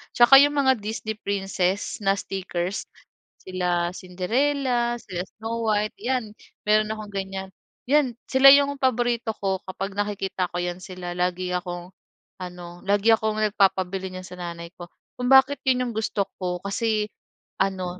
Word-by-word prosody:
Tsaka 245 +3 +8
'yong 290 +1 +3
mga 265 -4 +3
Disney 220 +1 -4
Princess 195 -1 -1
na 195 0 +3
stickers. 185 0 -3 0.6
Sila 180 -2 -1
Cinderella, 240 +7 0
sila 180 -2 -5
Snow 225 +1 -3
White, 210 0 0
'yan 240 -2 -1 0.4
meron 215 0 +3
akong 215 -1 -8
ganyan. 190 -1 -4 0.4
'Yan, 280 -4 +3
sila 265 +1 +8
'yong 280 0 +3
paborito 240 -2 +1
ko 190 -1 -1
kapag 195 +2 -4
nakikita 195 -3 -1
ko 175 - -4
'yan 175 0 -3
sila 180 -2 -7
lagi 180 0 -1
akong 175 0 -5 0.5
ano, 175 -1 -8
lagi 205 +3 +4
akong 220 -1 +1 0.2
nagpapabili 190 -1 +1
niyan 185 0 -7
sa 180 - -11
nanay 170 -1 -6
ko. 175 - -8 0.3
Kung 250 - -1
bakit 270 +2 +6
'yon 250 -1 +3
'yong 235 - -6
gusto 215 -2 0 0.2
ko 180 -1 -2
kasi 215 +1 0 0.5
ano, 185 -2 -1
200 Hz, 145 wpm, -24 LUFS, 180-235 Hz, 0.6 s, Tsaka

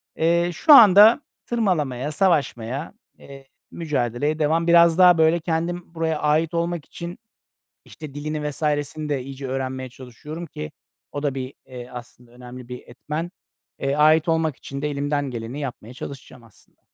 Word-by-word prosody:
eee, 170 +2 +2
şu 295 - +5
anda 215 +2 +8 0.2
tırmalamaya, 155 - -1
savaşmaya, 145 - -1 0.2
eee, 135 -1 -14 0.2
mücadeleye 145 -1 -2
devam. 160 +2 +1
Biraz 170 0 +6
daha 180 -2 +7
böyle 160 +1 +3
kendim 170 +1 -3
buraya 160 -1 -1
ait 155 +2 +1
olmak 170 -2 -2
için, 170 +1 -8 0.7
işte, 155 -4 -11
dilini, 150 0 -3
vs.sini 150 0 -2
de 140 -3 -1
iyice 135 +1 -8
öğrenmeye 130 0 -4
çalışıyorum 135 +7 -9
ki 75 - -7 0.4
o 145 - -5
da 140 -2 -1
bir, 130 0 -6
eee, 125 -2 -9
aslında 120 0 -12
önemli 125 0 -11
bir 125 0 -6
etmen. 150 +7 -5 0.5
Eee, 135 0 -1
ait 155 +3 +4
olmak 160 -3 +1
için 140 0 -8
de 150 - -1
elimden 145 0 -2
geleni 120 +4 -6
yapmaya 125 -3 -7
çalışacağım 130 -2 -10
aslında. 110 -3 -24
150 Hz, 150 wpm, -22 LUFS, 130-165 Hz, 0.7 s, anda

